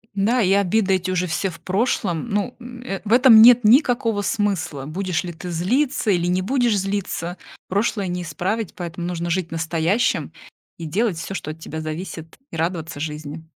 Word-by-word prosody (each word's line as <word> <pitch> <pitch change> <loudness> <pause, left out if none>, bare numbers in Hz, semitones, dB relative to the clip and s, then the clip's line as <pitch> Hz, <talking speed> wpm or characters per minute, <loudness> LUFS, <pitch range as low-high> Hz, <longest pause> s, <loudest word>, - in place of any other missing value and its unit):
Да, 225 +5 +2
и 190 -3 +2
обиды 200 0 +3
эти 185 0 -3
уже 180 -1 0
все 175 +4 -1
в 170 - -11
прошлом. 190 -2 -1
Ну, 205 +4 -1
м, 245 0 -10
э, 195 -6 -4
в 210 - +1
этом 240 -3 +8
нет 245 +1 +8
никакого 230 -3 +3
смысла. 190 -10 -1
Будешь 180 +2 -2
ли 175 - -5
ты 175 +2 -8
злиться 220 - 0
или 175 -1 +1
не 180 +1 +1
будешь 240 +1 +1
злиться 190 -3 -3 0.3
прошлое 200 0 0
не 180 0 -3
исправить, 185 +6 -3
поэтому 175 0 -5
нужно 170 -1 -3
жить 175 0 -1
настоящим 165 +6 0 0.4
и 170 - -8
делать 195 +2 0
всё, 180 +4 -5
что 155 - -4
от 160 - -11
тебя 160 0 -6
зависит, 160 +1 -6
и - - -6
радоваться 160 -3 -3
жизни. 150 +1 -6
185 Hz, 180 wpm, -22 LUFS, 165-215 Hz, 0.4 s, этом